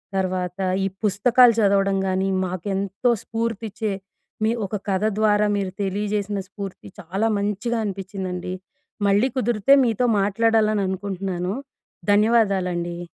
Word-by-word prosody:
తర్వాత 185 -1 -2 0.3
ఈ - - +2 0.2
పుస్తకాలు 235 +4 +5
చదవడం 195 -1 +3
గానీ 190 +1 0 0.2
మాకు 180 0 -5
ఎంతో 195 +5 -1
స్ఫూర్తి 225 -1 -3
ఇచ్చే 215 +1 -3 0.5
మీ 220 - +3
ఒక 210 - -4
కథ 190 +2 0 0.2
ద్వారా 210 -1 +3
మీరు 190 -2 -2
తెలియజేసిన 205 +1 -1
స్ఫూర్తి 200 -2 -8
చాలా 195 +5 -1
మంచిగా 210 +4 -1
అనిపించిందండి. 190 -2 -4 0.5
మళ్ళీ 205 +6 +4
కుదిరితే 240 +2 +4
మీతో 230 +2 +1
మాట్లాడాలని 215 0 +2
అనుకుంటున్నాను. 190 -1 -3 0.6
ధన్యవాదాలండీ. 190 -6 +2
200 Hz, 115 wpm, -23 LUFS, 190-215 Hz, 0.6 s, పుస్తకాలు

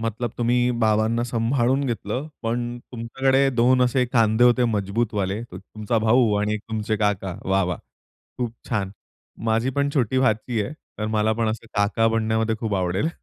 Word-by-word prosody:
मतलब 115 +1 -2
तुम्ही 120 +1 +2
बाबांना 110 +2 +2
सांभाळून 120 +3 +1
घेतलं 120 +2 -3 0.2
पण 120 +1 -2
तुमच्याकडे 135 +3 +1
2 125 +1 +3
असे 125 +1 +2
खांदे 115 0 +4
होते 125 0 +4
मजबूत 105 +3 -1
वाले 100 0 -1
एक 120 - -7
तुमचा 110 +3 -3
भाऊ 115 -1 +4
आणि 105 +1 0
तुमचे 110 0 -3
काका. 100 -4 -1
वाह! 95 +1 +2
वाह! 90 -1 -3 0.6
खूप 120 -2 -2 0.2
छान! 100 -5 -1 0.6
माझी 115 +4 +1
पण 140 +1 0
छोटी 130 -1 +1
भाची 110 -2 +1
आहे 100 - -5 0.3
तर 105 - -2
मला 110 0 +1
पण 115 0 0
असे 115 +1 -4
काका 100 +2 +2
बनण्यामध्ये 110 0 0
खूप 110 -3 -1
आवडेल. 95 - 0
115 Hz, 165 wpm, -23 LUFS, 105-120 Hz, 0.6 s, खांदे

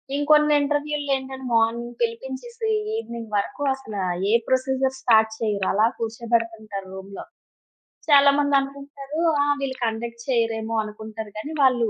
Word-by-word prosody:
ఇంకొన్ని 300 +1 +4
ఇంటర్‌వ్యూ‌ళ్లు 290 0 -1
ఏంటంటే 265 0 -8
morning 230 +1 +1
పిలిపించేసి 265 - -3 0.3
evening 235 - -6
వరకు 200 +7 -3
అసలా 220 -7 -5 0.3
ఏ - - +3
ప్రొసిజర్ 265 0 +1
స్టార్ట్ 220 -2 +4
చెయ్యరు, 205 -3 0
అలా 210 +3 +4
కూర్చోబెడతుంటారు 225 -3 -2
రూమ్‌లో. 195 +1 -8 0.8
చాలామంది 285 -1 +5
అనుకుంటారు 280 +2 -6 0.2
"ఆ! - - +4 0.2
వీళ్ళు 270 -1 -3
కండక్ట్ 235 +1 -4
చేయరేమో 225 -2 0
అనుకుంటారు. 215 0 -7
కానీ, 255 +9 -5
వాళ్ళు 250 -4 +4
240 Hz, 120 wpm, -24 LUFS, 225-280 Hz, 0.8 s, చాలామంది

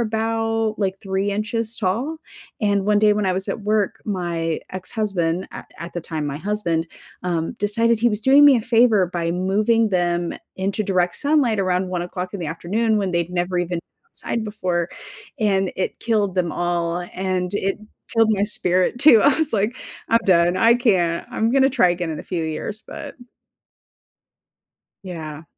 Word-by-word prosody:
about 225 0 -1
like 195 -2 -1
3 195 0 -1
inches 225 +2 -2
tall 230 +11 -1 0.4
and 200 -2 +1
one 210 -1 +4
day 210 0 +5
when 205 -1 0
I 185 - +2
was 190 +2 -4
at 205 - -3
work, 210 -1 0
my 170 -4 -2
ex-husband 185 -2 -2
at - - -10
at 170 +1 -7
the 175 - -4
time, 155 -2 -4
my 140 0 -4
husband, 170 -3 -1 0.4
um, 170 -2 -1
decided 230 +2 +2
he 240 - +4
was 210 -2 -1
doing 275 +4 +6
me 275 -3 +7
a 225 - -1
favor 225 -5 +4
by 170 -1 -1
moving 210 +5 +1
them 175 -2 0 0.2
into 195 +3 -1
direct 180 -3 0
sunlight 285 -7 +2
around 185 0 0
1:00 180 0 -4
in 200 - -5
the 170 - -3
afternoon 205 +8 0
when 195 -3 0
they'd 170 0 -1
never 180 0 -1
even 175 0 -1
been - - -6 0.3
outside 235 - -4
before 180 -5 -2 0.5
and 195 -4 +1
it 185 - -2
killed 210 -5 0
them 180 -3 0
all 175 -1 -1 0.2
and 185 0 -2
it 195 -1 -1 0.4
killed 225 -1 +4
my 200 -2 +1
spirit 185 +1 +1
too. 255 -6 +7
I 285 -1 +5
was 315 -2 -1
like, 215 +5 0 0.3
"I'm 230 - +5
done, 175 -1 +4
I 230 +1 +5
can't, 185 -9 +1
I'm 225 +1 0
gonna 270 +1 +4
try 245 -8 +4
again 175 -1 -2
in 155 - -4
a - - -9
few 170 -3 -3
years," 180 +7 -4
but 290 -3 -8 1.9
Yeah. 160 -4 -7
195 Hz, 175 wpm, -21 LUFS, 175-220 Hz, 1.9 s, me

